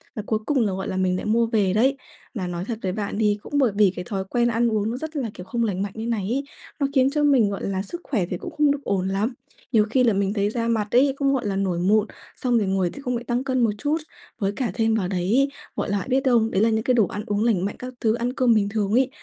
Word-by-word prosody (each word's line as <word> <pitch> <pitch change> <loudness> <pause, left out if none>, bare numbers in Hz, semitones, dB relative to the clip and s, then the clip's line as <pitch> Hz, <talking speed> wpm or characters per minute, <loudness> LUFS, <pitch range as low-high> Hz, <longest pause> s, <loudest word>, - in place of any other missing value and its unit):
và 215 - -4
cuối 215 0 0
cùng 290 +1 +1
là, 200 - 0
gọi 190 +1 -4
là, 185 - -3
mình 185 -1 +1
lại - - -5
mua 230 +2 +3
về 210 -5 +1
đấy. 260 +6 +3 0.4
Là 190 -6 -3
nói 175 0 -4
thật 225 0 -4
với 185 - -1
bạn 205 +1 -3
thì 210 -2 +2
cũng - - -12
bởi 260 -6 +3
vì 205 -2 +5
cái 180 - -5
thói 195 -4 -2
quen 240 -1 +2
ăn 235 0 +1
uống 215 0 0
nó 240 - -3
rất 315 +3 -6
là, 260 -6 -2
kiểu, 180 - -9
không 235 +5 -1
lành 195 -4 -1
mạnh 200 -1 -2
như 225 +1 -4
này 225 -4 -1
ấy, 275 +3 0 0.4
nó 280 - +2
khiến 265 0 +5
cho 295 +1 0
mình, 265 -8 +4
gọi 200 - -5
là, 190 -1 -1
sức 340 - -7
khỏe 210 -10 -1
thì 180 - -2
cũng - - -7
không 300 -1 +4
được 285 0 -3
ổn 190 -2 0
lắm. 205 +6 -1 0.4
Nhiều 215 -4 +4
khi 255 +3 +3
là 230 -3 +4
mình 200 0 0
thấy 205 -1 +1
da 230 +1 -2
mặt 220 -3 0
ấy, 270 +2 +5
cũng, 275 -1 +2
gọi 260 -4 -1
là, 195 - -1
nổi 190 -3 0
mụn, 210 +4 +3 0.3
xong 245 -2 +1
rồi 210 -3 +1
ngồi 190 -2 +1
th - - -10
không 250 -2 -2
lại 235 - -4
tăng 240 +2 -1
cân 260 -2 0
một 225 - +3
chút. 295 +6 0 0.4
Với 195 -1 0
cả 235 -3 -1
thêm 225 +1 +1
vào 200 -5 0
đấy, 200 +10 +1 0.3
gọi - - -2
là, 200 -2 -1
biết 265 +1 +3
không, 235 -3 +3
đấy 190 - +1
là 225 - +4
những 220 0 0
cái 255 - +2
đồ 225 -6 +4
ăn 205 - -5
uống 205 +1 0
lành 210 -6 +2
mạnh 205 - -3
các 255 0 -7
thứ, 220 -1 +2
ăn 240 +1 -2
cơm 255 -3 +3
bình 205 -2 +2
thường 205 -1 -1
ấy, 255 +4 +3
220 Hz, 305 wpm, -23 LUFS, 200-250 Hz, 0.4 s, vì